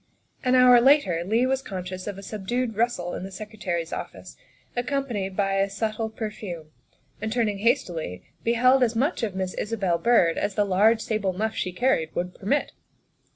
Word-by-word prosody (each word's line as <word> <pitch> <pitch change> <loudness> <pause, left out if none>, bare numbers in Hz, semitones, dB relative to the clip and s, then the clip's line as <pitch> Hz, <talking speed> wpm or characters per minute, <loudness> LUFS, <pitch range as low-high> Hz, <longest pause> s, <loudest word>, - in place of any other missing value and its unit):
An 255 0 +3
hour 250 -1 +7
later 235 - +4
Leigh 225 +7 +2
was 265 +1 0
conscious 185 -4 -6
of 200 -2 -4
a 195 - -9
subdued 225 +4 -3
rustle 220 -6 0
in - - -4
the 190 - -6
Secretary's 190 -4 -4
office, - - -7 0.4
accompanied 245 -7 -2
by 195 -1 +1
a 195 0 +2
subtle 220 +2 -2
per 220 -1 -5
fume, 170 -7 -8 0.5
and, 220 0 -2
turning 220 -4 0
hastily, 175 - -1 0.2
beheld 255 +3 +4
as 240 -2 +2
much 280 +9 0
of 210 -5 -2
Miss 185 -1 -2
Isabel 195 -6 -1
Byrd 225 -9 +3
as 205 -1 -2
the 205 - +2
large 210 +4 +3
sable 215 -5 -1
muff 220 +4 -1
she 185 - -2
carried 180 -6 0
would 180 +1 -2
permit. 275 +9 -1
215 Hz, 175 wpm, -25 LUFS, 185-240 Hz, 0.5 s, hour